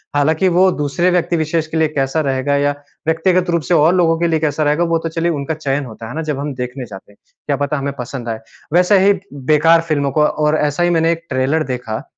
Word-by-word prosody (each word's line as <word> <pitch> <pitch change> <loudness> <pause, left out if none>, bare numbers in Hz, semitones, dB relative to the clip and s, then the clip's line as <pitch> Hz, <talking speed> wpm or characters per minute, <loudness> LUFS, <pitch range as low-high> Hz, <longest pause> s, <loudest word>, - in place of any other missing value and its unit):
हालाँकि 155 +5 +2
वो 190 - +6
दूसरे 150 +5 0
व्यक्ति 175 -1 +1
विशेष 160 0 -1
के 160 - -4
लिए 160 -1 +3
कैसा 135 +4 0
रहेगा 135 +2 0
या, 145 0 +2 0.4
व्यक्तिगत 175 +2 +1
रूप 170 -1 +1
से 175 - -1
और 160 +2 +4
लोगों 165 -2 +3
के 170 - +1
लिए 160 -1 +1
कैसा 155 0 0
रहेगा? 150 +3 +2
वो 165 -1 +1
तो 165 - -4
चलिए 170 +1 -1
उनका 145 0 -3
चयन 145 -2 -2
होता 115 -1 -10
है, 110 - -7
है - - -8
ना? 160 - -2
जब 150 -3 -3
हम 145 0 -3
देखने 125 +1 -5
जाते 100 -1 -12
हैं। 100 - -24 0.3
क्या 145 - +1
पता 145 +1 -1
हमें 140 0 -3
पसंद 120 -1 -5
आए? 110 -1 -3 0.3
वैसे 180 +3 +4
ही 200 - +6 0.2
बेकार 155 +4 +3
फ़िल्मों 140 -3 0
को 150 +2 +2
और 150 0 +1
ऐसा 150 +3 0
ही 175 - +3
मैंने 165 -1 +2
एक 170 0 -4
ट्रेलर 135 +4 0
देखा 115 -3 -5
150 Hz, 245 wpm, -17 LUFS, 140-165 Hz, 0.4 s, वो